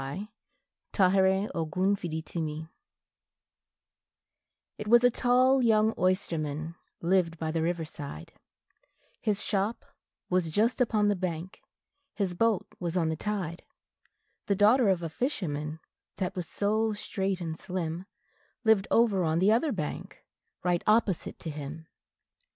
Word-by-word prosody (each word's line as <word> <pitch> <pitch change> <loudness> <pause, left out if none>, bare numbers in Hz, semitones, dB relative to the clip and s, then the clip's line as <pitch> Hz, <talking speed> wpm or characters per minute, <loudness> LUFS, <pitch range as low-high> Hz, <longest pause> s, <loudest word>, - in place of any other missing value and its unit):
THE 170 +10 -5 0.7
BALLAD 190 +1 +3
OF 160 -2 -3
THE 190 +4 +2
OYSTERMAN 160 -1 -4 2.1
IT 210 - -5
was 240 +2 +6
a 245 - +6
tall 255 +2 +4
young 220 -2 +4
oysterman 160 -4 -1 0.3
lived 170 -1 +2
by 160 0 -2
the 165 0 -1
river 170 0 -1
side, 140 - -9 0.9
His 210 -2 -1
shop 205 +3 -1 0.4
was 180 -2 +1
just 225 - +1
upon 215 -3 +3
the 205 - +3
bank, 180 -1 -4 0.5
his 195 -3 -1
boat 220 +1 +1
was 175 0 -2
on 165 -2 +2
the 160 - -1
tide; 185 -2 -3 0.8
The 200 - +2
daughter 215 +3 +5
of 180 -3 +1
a - - -1
fisherman, 155 - -3 0.4
that 185 -2 -2
was 180 -3 -4
so 215 +2 0
straight 195 -2 -2
and 165 -3 -4
slim, 180 0 -4 0.6
Lived 220 -3 +4
over 215 -5 +3
on 160 0 +1
the 190 +5 +4
other 260 +7 +2
bank, 155 - -5 0.4
right 175 -1 +1
opposite 215 -4 +2
to 160 - -6
him. 150 +2 -7
185 Hz, 135 wpm, -29 LUFS, 165-210 Hz, 2.1 s, was